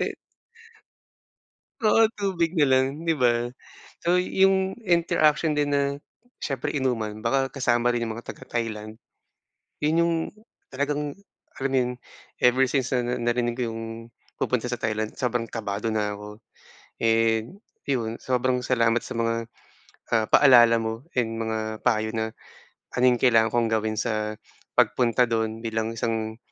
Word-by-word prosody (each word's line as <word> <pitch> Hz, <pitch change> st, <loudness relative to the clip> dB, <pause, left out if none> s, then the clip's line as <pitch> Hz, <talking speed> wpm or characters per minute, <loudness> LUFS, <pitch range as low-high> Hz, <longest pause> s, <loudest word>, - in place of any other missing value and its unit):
E -, -, -2 dB, 1.7 s
Oo, 220 Hz, +1 st, +5 dB
tubig 185 Hz, -4 st, -1 dB
na 150 Hz, -, +5 dB
lang, 135 Hz, +3 st, +1 dB
'di 165 Hz, -, +2 dB
ba. 120 Hz, 0 st, +2 dB, 0.5 s
So, 175 Hz, +1 st, +2 dB
'yong 190 Hz, +2 st, +2 dB
interaction 160 Hz, -2 st, +3 dB
din 145 Hz, -1 st, +1 dB
na, 140 Hz, -, +2 dB, 0.6 s
siyempre 135 Hz, -4 st, -3 dB
inuman 115 Hz, -6 st, -1 dB
baka 135 Hz, +3 st, 0 dB
kasama 120 Hz, -2 st, +1 dB
rin 120 Hz, -, -1 dB
'yong 110 Hz, -1 st, -4 dB
mga 120 Hz, -, -9 dB
taga -, -, -15 dB
Thailand. 110 Hz, -2 st, -4 dB, 0.8 s
'Yon 155 Hz, +2 st, +1 dB
'yong, 170 Hz, 0 st, +1 dB, 0.5 s
talagang, 145 Hz, +2 st, -2 dB, 0.4 s
alam 135 Hz, 0 st, -2 dB
mo -, -, +2 dB
'yon, 125 Hz, 0 st, -1 dB, 0.5 s
ever 130 Hz, +1 st, +5 dB
since 130 Hz, -1 st, -1 dB
na 125 Hz, -1 st, 0 dB
narinig 120 Hz, 0 st, 0 dB
ko 120 Hz, -3 st, -2 dB
'yong, 115 Hz, 0 st, -6 dB, 0.5 s
pupunta 125 Hz, -1 st, -1 dB
sa 120 Hz, -, -2 dB
Thailand, 110 Hz, -2 st, -3 dB
sobrang 120 Hz, -2 st, -1 dB
kabado 105 Hz, -1 st, -3 dB
na 105 Hz, -2 st, 0 dB
ako. 105 Hz, +2 st, -10 dB, 0.6 s
And 115 Hz, -, +1 dB, 0.2 s
'yon, 115 Hz, -4 st, -1 dB
sobrang 125 Hz, 0 st, 0 dB
salamat 120 Hz, -2 st, +2 dB
sa 130 Hz, -, -7 dB
mga, 115 Hz, 0 st, +1 dB, 0.8 s
ah, 110 Hz, -1 st, +3 dB
paalala 120 Hz, -4 st, +7 dB
mo, 115 Hz, +6 st, -4 dB
and 115 Hz, -2 st, 0 dB
mga 110 Hz, -1 st, -3 dB
payo 110 Hz, -1 st, +1 dB
na, 110 Hz, 0 st, -1 dB, 0.6 s
ano 125 Hz, -, 0 dB
'yong 125 Hz, -, +2 dB
kailangan 115 Hz, -3 st, +5 dB
kong 120 Hz, -1 st, +2 dB
gawin 110 Hz, 0 st, 0 dB
sa 110 Hz, -1 st, -2 dB, 0.4 s
pagpunta 125 Hz, 0 st, +3 dB
do'n 115 Hz, -1 st, -2 dB
bilang 110 Hz, 0 st, -2 dB
isang, 110 Hz, -1 st, -2 dB
120 Hz, 145 wpm, -25 LUFS, 110-135 Hz, 1.7 s, paalala